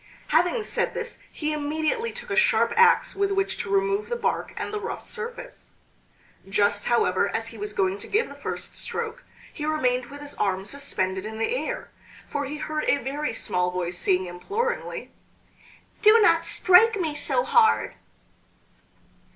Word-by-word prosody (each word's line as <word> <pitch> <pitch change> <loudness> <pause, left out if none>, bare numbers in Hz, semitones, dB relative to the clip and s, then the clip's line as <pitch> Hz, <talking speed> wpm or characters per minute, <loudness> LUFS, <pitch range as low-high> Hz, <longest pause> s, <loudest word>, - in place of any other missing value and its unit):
Having 355 +8 +2
said - - -1
this 480 0 -4
he 305 -1 -2
immediately 310 +10 -1
took - - -8
a - - +1
sharp 480 0 +3
axe 465 0 +5
with 395 0 0
which 390 0 0
to 200 - -4
remove 195 +1 +1
the - - -1
bark 475 - -1
and 415 - -4
the 425 - -1
rough 445 - -5
surface. 475 +1 -8 0.7
Just, 205 0 +2
however, 200 -4 +2
as 225 +1 -3
he 230 - -11
was 210 0 -3
going 195 0 0
to - - -7
give 440 +4 +1
the - - -10
first - - -6
stroke 465 +2 -4 0.3
he 300 - -6
remained 255 -5 0
with 285 +3 -10
his 290 0 -6
arm 190 -1 -1
suspended 190 -7 -2
in 220 +1 -6
the 225 - 0
air, - - -4 0.4
for 285 -1 -2
he 290 +3 -5
heard 305 0 -3
a - - +3
very 280 +3 -3
small 180 0 -1
voice 180 -1 -3
saying 185 -1 +2
imploringly: 415 - -3 0.9
"Do 435 +1 +7
not 335 -5 +4
strike 385 +5 +5
me 320 -4 -1
so 295 +11 +1
hard!" 450 -3 +3
300 Hz, 165 wpm, -25 LUFS, -, 0.9 s, Do